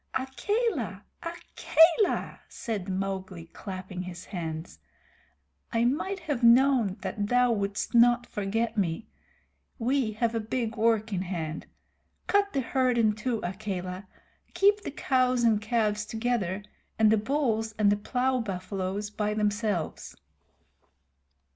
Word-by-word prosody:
"Akela! 265 - -1 0.2
Akela!" 335 +2 +2
said 210 -6 -4
Mowgli, 190 -2 -3
clapping 185 -2 -6
his 180 -1 -8
hands. 160 - -6 0.9
"I 230 0 +2
might 355 +9 -1
have 295 -6 -2
known 235 -4 +5
that 205 -1 -3
thou 245 +1 +3
wouldst 200 -2 -2
not 240 +1 +5
forget 210 +3 -2
me. 170 -6 -1 0.7
We 245 -2 0
have 230 +2 0
a 230 - 0
big 225 +1 -2
work 225 -1 +1
in 185 - 0
hand. 170 -4 -4 0.6
Cut 405 0 +2
the 275 - 0
herd 255 0 +1
in 220 -2 +4
two, 220 +2 -2
Akela. 185 0 -4 0.5
Keep 410 +1 +4
the - - -5
cows 255 -3 +1
and 220 -3 +3
calves 215 -1 0
together, 220 -4 -1 0.3
and 220 -1 +5
the 220 - +5
bulls 225 -2 0
and 205 -1 +4
the - - +4
plow 250 +5 0
buffaloes 195 0 -4
by 210 0 -1
themselves." 205 -4 -1
220 Hz, 125 wpm, -28 LUFS, 195-250 Hz, 0.9 s, known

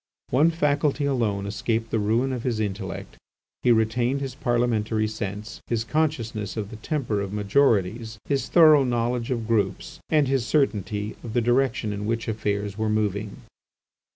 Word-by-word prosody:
One 145 +6 +5
faculty 150 -2 +1
alone 110 -8 0
escaped 110 +3 -2
the 110 - +1
ruin 115 +6 +1
of 125 - -3
his 120 -3 -1
intellect: 100 -2 -4 0.4
he 125 - +4
retained 120 +4 +2
his 135 -2 -4
Parliamentary 120 -4 0
sense, 105 0 -6
his 115 -1 0
consciousness 115 -6 -2
of 105 -1 -4
the 110 - -8
temper 115 -4 -2
of 100 -1 -4
majorities, 110 0 +1
his 140 -2 -1
thorough 155 -4 +7
knowledge 120 -1 -1
of 115 -4 -2
groups, 115 - -1
and 150 -3 +3
his 135 -2 +1
certainty 105 -7 0
of 115 - -6
the 120 - +2
direction 120 -2 +1
in 105 +1 -4
which 115 0 -1
affairs 105 -2 -2
were 110 0 0
moving. 105 +2 -2
115 Hz, 155 wpm, -25 LUFS, 105-130 Hz, 0.4 s, thorough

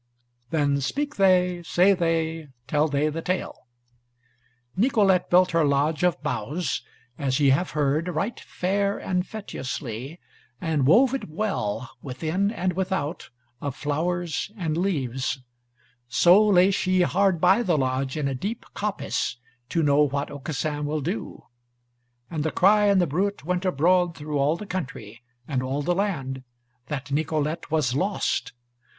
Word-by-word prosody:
Then 145 -3 +1
speak 290 - -2
they, 180 -2 +3
say 180 +3 +4
they, 165 -3 -1 0.2
tell 150 +3 +2
they 145 +1 +1
the 160 +2 -4
Tale: 180 -7 -3 1.1
Nicolete 200 -4 +3
built 180 +1 +5
her 165 -1 +3
lodge 145 +2 +1
of 180 -4 +2
boughs, 145 +9 -2 0.4
as 135 -1 0
ye 140 -2 +4
have 170 +7 +1
heard, 150 +3 +1
right 180 +7 -2
fair 200 +2 -1
and 180 -1 -1
feteously, 135 - -6 0.4
and 155 -6 0
wove 250 - +5
it 270 - -3
well, 140 - -2
within 160 +9 -1
and 185 -4 -1
without, 185 -4 -2 0.3
of 140 -2 -3
flowers 170 +4 -2
and 165 -5 -1
leaves. 135 -8 -1 0.6
So 180 - +5
lay 190 -1 +5
she 185 -1 +1
hard 190 -1 +2
by 190 +7 +4
the 175 -8 +1
lodge 130 +1 -1
in 150 -2 0
a 135 - -1
deep 205 - -4
coppice 205 - -2 0.3
to 165 +2 +1
know 145 0 +4
what 140 -1 0
Aucassin 145 +1 -3
will 150 0 -1
do. 115 -5 -4 0.8
And 150 +2 -3
the 160 - 0
cry 205 +5 +4
and 200 -1 +4
the 180 - +3
bruit 185 +3 -1
went 180 +2 -1
abroad 175 +1 +2
through 150 -1 -3
all 145 +3 +2
the 210 - -7
country 120 - -6 0.3
and 130 -3 -1
all 135 +3 -2
the 175 - +1
land, 140 -10 -2 0.4
that 140 -2 -5
Nicolete 155 +2 -1
was 150 -6 +1
lost. 190 +9 -1
160 Hz, 145 wpm, -25 LUFS, 140-185 Hz, 1.1 s, built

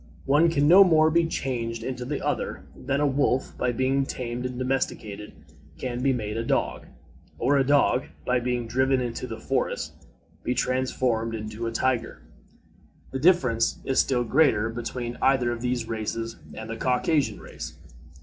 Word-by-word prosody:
One 150 +5 +4
can 145 -3 +2
no 185 +5 +9
more 160 -3 +4
be 170 0 +3
changed 115 -6 -3
into 125 0 -4
the 145 +2 -3
other, - - -2
than 135 +2 -2
a 150 - +2
wolf, 135 -2 +1
by 125 - 0
being 130 +3 +1
tamed 125 -1 -4
and 125 -1 -7
domesticated, 125 -5 -2 0.5
can 125 -1 -4
be 135 +1 +3
made 110 -4 -3
a 115 - -1
dog, - - -1 0.5
or 145 - +2
a 135 - +4
dog, 140 -1 +3 0.2
by 125 0 +2
being 120 -1 -1
driven 130 +3 +2
into 125 0 -3
the 115 -2 -6
forests, - - -1 0.5
be 125 - -1
transformed 125 -3 0
into 110 +1 -5
a - - -2
tiger. 125 +1 -1 0.9
The 130 - -3
difference 130 -9 +3
is 135 - +1
still 125 -2 +2
greater 120 -4 +3
between 120 +1 -5
either 130 -3 +3
of 120 -1 -4
these 125 -2 -1
races 115 0 -3 0.2
and 110 - -7
the 115 - -4
Caucasian 130 +5 +1
race. - - -9
125 Hz, 165 wpm, -26 LUFS, 115-135 Hz, 0.9 s, no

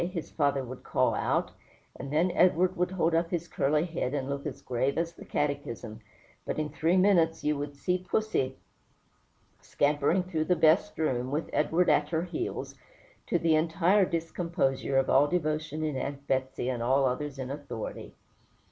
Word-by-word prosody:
his 170 -1 -4
father 140 -2 +1
would 130 +1 -8
call - - +1
out; - - 0 0.4
and 135 +2 -7
then 165 +5 +2
Edward 180 +1 +3
would 180 0 0
hold 170 -3 0
up 165 +1 +1
his 170 -1 -2
curly 150 +2 +1
head, 160 -6 -3
and 135 -2 -2
look 140 +1 -3
as 135 - -7
grave 130 +2 -1
as 165 0 -1
the - - -12
Catechism; 125 -6 -3 0.4
but - - -4
in 155 -1 -1
three 165 +4 +1
minutes 175 -4 +3
you 150 0 +1
would 145 0 -5
see 180 +6 0
"pussy" 180 -8 -1 1.0
scampering 145 +5 +1
through 165 -4 -2
the 180 - +2
"best 165 +5 +3
room," 130 -5 0
with 150 +4 -3
Edward 165 +4 +2
at 150 0 +3
her 160 0 0
heels, 340 - -4 0.5
to - - +2
the 165 -2 +2
entire 170 +5 +3
discomposure 165 -6 -1
of 135 - +3
all 140 +2 +5
devotion 155 -2 -1
in 155 -3 -1
Aunt 140 +1 -4
Betsey 130 -2 -1
and 125 -2 -2
all 135 +3 +3
others 135 +2 -2
in 130 0 -5
authority. 140 -6 -6
155 Hz, 175 wpm, -29 LUFS, 135-170 Hz, 1.0 s, all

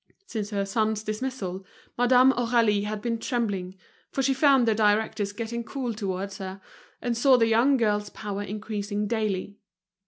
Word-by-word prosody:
Since 210 - -4
her 200 -2 -1
son's 215 +1 0
dismissal, 215 -4 -4 0.3
Madame 250 +2 +5
Aurélie 230 -5 +2
had 210 0 -4
been 230 -1 -1
trembling, 205 -8 -2 0.3
for 270 - -1
she 270 +1 +3
found 270 -3 +4
the 225 - +4
directors 210 -1 +1
getting 230 +2 -4
cool 250 -1 -4
towards 195 -2 -4
her, 190 0 -6 0.4
and 240 -1 0
saw 255 +2 +5
the 230 - +4
young 235 +5 +4
girl's 210 -3 0
power 205 -1 -5
increasing 210 0 -3
daily. 205 -2 -2
215 Hz, 155 wpm, -26 LUFS, 205-240 Hz, 0.4 s, Madame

